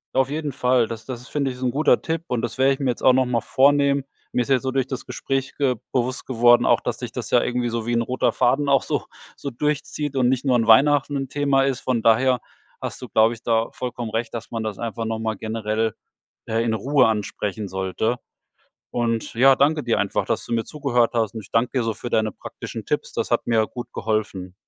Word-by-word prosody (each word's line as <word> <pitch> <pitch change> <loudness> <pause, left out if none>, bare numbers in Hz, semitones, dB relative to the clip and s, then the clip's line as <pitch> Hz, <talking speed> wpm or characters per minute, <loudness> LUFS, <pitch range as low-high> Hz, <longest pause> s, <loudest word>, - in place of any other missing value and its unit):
Auf 135 0 +3
jeden 150 0 -3
Fall, 125 -2 +2
das 115 -1 -7
das 125 -2 -6
ist 125 - -14
finde 140 -3 -1
ich 125 - -9
ist 130 - -7
'n 125 - +1
guter 150 +4 +3
Tipp 165 0 -2
und 125 -5 -1
das 115 0 -4
werde 135 +1 +4
ich 135 - -7
mir 135 - 0
jetzt 120 - -2
auch 130 - +6
noch 130 0 +3
mal 125 -1 0
vornehmen. 140 +3 +3 0.3
Mir 125 - +2
ist 120 - -4
jetzt 130 -2 +3
so 130 - -1
durch 135 -1 0
das 130 -2 -5
Gespräch 135 0 -3
ge 135 -3 +2 0.2
bewusst 130 +1 -1
geworden, 120 -1 +4
auch - - +4
dass - - -3
sich - - -6
das - - -5
ja - - +5
irgendwie 120 0 -1
so 115 -1 -3
wie 120 - -1
'n 115 - +2
roter 125 +2 0
Faden 135 +4 +2
auch 135 -1 +4
so - - -2 0.3
so 140 - -5
durchzieht 145 +1 -2
und 125 - +3
nicht 130 +1 +1
nur 130 -3 +2
an 115 -1 0
Weihnachten 145 +5 +5
'n 135 -2 -3
Thema 140 -2 +2
ist. 135 -1 0
Von 125 -4 -1
daher 125 +2 +3 0.4
hast - - -5
du, - - -6
glaube 110 +1 +3
ich, 115 - -11
da 115 -1 +1
vollkommen 120 -3 -5
recht, 115 +1 -2
dass 115 -1 -6
man 115 -1 -3
das 110 -3 -4
einfach 115 -1 -4
noch 110 0 -2
mal 110 -1 -2
generell, 110 0 -2 0.5
äh, 115 +1 0
in 115 -1 0
Ruhe 130 +3 +3
ansprechen 105 -1 -3
sollte. 95 +6 -1 0.7
Und 115 -2 -1
ja, 135 +2 +6
danke 150 +3 +2
dir 115 - +1
einfach, 100 0 0
dass - - -2
du - - -10
mir 115 -1 0
zugehört 130 -6 0
hast 115 -3 0
und 110 - -4
ich 100 - -16
danke 115 +2 +2
dir - - 0
so 115 -1 -1
für 120 - -7
deine 110 -1 +1
praktischen - - -8
Tipps. - - -2
Das - - -2
hat - - +1
mir 110 -2 +3
gut 120 - -8
geholfen. 105 -4 -2
120 Hz, 245 wpm, -23 LUFS, 115-135 Hz, 0.7 s, auch